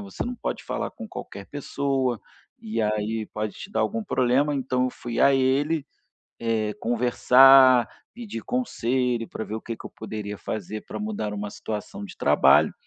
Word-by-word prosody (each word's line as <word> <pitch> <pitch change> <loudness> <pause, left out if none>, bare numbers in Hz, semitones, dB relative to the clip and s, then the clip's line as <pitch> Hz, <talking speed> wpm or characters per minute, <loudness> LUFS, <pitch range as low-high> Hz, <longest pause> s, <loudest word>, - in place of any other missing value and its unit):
Você 200 -1 -5
não 245 +1 -3
pode - - -4
falar - - -3
com 230 -4 -9
qualquer 100 - -8
pessoa, 135 -4 -1 0.4
e 110 +1 -3
aí 110 +1 -1
pode 105 -1 -2
te 200 - -9
dar - - 0
algum 225 +1 -1
problema, 135 -1 +2
então 130 -2 0
eu 130 - 0
fui 120 -1 -5
a 140 0 +6
ele, 140 +3 +1 0.6
eh, 110 -2 0
conversar, 125 +1 +6 0.3
pedir 235 -3 -7
conselho 125 - -1
para 110 - -5
ver 110 - -6
o 110 - -4
que - - -5
é - - -5
que - - -13
eu - - -10
poderia 105 -2 -6
fazer 110 +1 -5
para - - -6
mudar 210 - -3
uma 105 0 -4
situação 110 - -6
de 205 - -10
trabalho, - - +4
125 Hz, 175 wpm, -25 LUFS, 110-140 Hz, 0.6 s, a